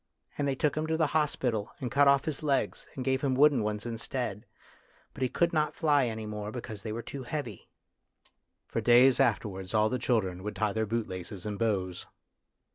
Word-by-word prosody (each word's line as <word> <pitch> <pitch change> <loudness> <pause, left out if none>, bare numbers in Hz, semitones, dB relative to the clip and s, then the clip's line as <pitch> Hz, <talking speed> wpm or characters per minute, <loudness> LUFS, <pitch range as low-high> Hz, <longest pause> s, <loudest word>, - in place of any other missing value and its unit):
And 145 - -1
they 135 - 0
took 145 +1 +1
him 155 +1 -1
to 160 0 0
the 160 - +3
hospital, 125 -8 0
and 125 -3 -4
cut 140 +2 +5
off 140 0 +4
his 155 -3 -3
legs, 140 -3 -1
and 130 - -4
gave 130 0 +1
hin> 135 -2 +1
wooden 140 -2 +5
ones 105 0 -2
instead. 115 -2 -4 0.7
But - - -11
he 130 - +2
could 170 +5 +1
not 155 -1 +1
fly 145 -5 +3
any 110 -1 -4
more 105 0 -5
because 110 -4 -7
they 110 - -5
were 115 +2 -4
too 140 - -7
heavy." 125 -5 -5 1.0
For - - -2
days 125 +2 +6
afterwards 105 -6 0
all 110 0 +4
the 125 - -1
children 95 -7 0
would 105 +2 -5
tie 110 -2 0
their 110 -1 -1
bootlaces 95 -5 -4
in 105 -1 -3
bows. 95 -5 -1
120 Hz, 200 wpm, -29 LUFS, 105-140 Hz, 1.0 s, days